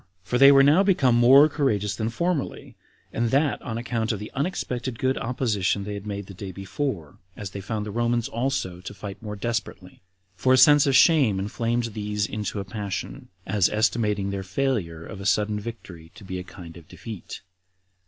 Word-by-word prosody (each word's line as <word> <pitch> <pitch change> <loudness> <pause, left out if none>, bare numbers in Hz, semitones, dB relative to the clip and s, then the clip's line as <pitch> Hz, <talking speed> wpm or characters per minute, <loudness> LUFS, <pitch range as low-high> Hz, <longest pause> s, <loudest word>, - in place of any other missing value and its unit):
For 125 +6 -1
they 135 +1 +9
were 135 -1 +7
now 150 +7 +5
become 175 -11 +3
more 130 +5 +7
courageous 105 -10 -1
than 110 0 -2
formerly, 170 +5 -3 0.4
and 115 0 0
that 140 +3 +1
on 115 - -5
account 115 -1 -2
of 110 - -2
the 105 +2 -8
unexpected 130 -5 -3
good 130 +2 0
opposition 110 -5 -1
they 105 +1 -5
had 100 0 -7
made 100 -1 -4
the 100 - -11
day 95 +1 -7
before, 95 - -5 0.2
as 100 -3 -6
they 100 - -6
found 105 +1 -4
the 105 - -5
Romans 120 +1 0
also 115 -7 -2
to - - -8
fight 100 -2 -8
more 105 -2 -6
desperately; 100 -4 -5 0.3
for 130 +8 +2
a - - +5
sense 145 +2 +6
of 135 - +3
shame 135 - +5
inflamed 115 +3 -2
these 105 -1 -2
into 105 0 -4
a 100 - -5
passion, 95 - -5 0.2
as 95 -1 +2
esteeming 105 -2 0
their 100 -1 -3
failure 95 -6 -2
of 100 - -9
a - - -7
sudden 105 +2 +1
victory 95 -7 -9
to - - -13
be 95 -1 -5
a - - -6
kind 85 -2 -12
of 85 -2 -15
defeat. 110 +2 -9
110 Hz, 190 wpm, -25 LUFS, 100-125 Hz, 0.4 s, they